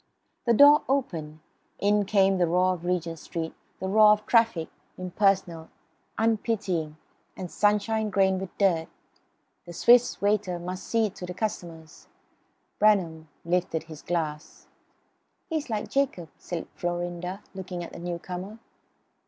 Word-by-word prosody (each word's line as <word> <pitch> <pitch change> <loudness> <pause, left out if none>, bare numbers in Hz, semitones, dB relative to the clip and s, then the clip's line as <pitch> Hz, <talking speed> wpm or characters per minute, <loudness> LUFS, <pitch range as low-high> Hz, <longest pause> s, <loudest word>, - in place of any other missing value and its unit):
The 235 - +4
door 290 +4 +8
opened; 160 - -2 0.4
in 205 0 +2
came 195 -1 +3
the 175 - +3
roar 180 +2 +2
of 175 -1 -8
Regent 170 -2 -2
Street, 160 0 -5 0.3
the 190 - -3
roar 210 +2 +6
of 210 0 -3
traffic, 225 -8 +3 0.3
impersonal, 185 -3 0 0.5
unpitying; 205 -8 -1 0.4
and 180 -2 -6
sunshine 210 +1 +1
grained 190 -1 +2
with 190 - -8
dirt. 170 -5 +2 0.8
The 175 - -9
Swiss 240 +7 +4
waiter 205 -3 +1
must 180 +2 -6
see 225 -3 +1
to 180 -1 -8
the 180 - -5
newcomers. 165 -7 -5 0.7
Bramham 175 -7 +2 0.2
lifted 170 -2 0
his 155 -3 -11
glass. 155 -3 -4 0.9
"He's 310 -4 -2
like 215 -2 -2
Jacob," 265 - -1
said 175 -2 -6
Florinda, 175 +2 -4
looking 185 -2 -6
at 170 - -9
the - - -8
newcomer. 180 +4 -6
185 Hz, 130 wpm, -27 LUFS, 170-210 Hz, 0.9 s, door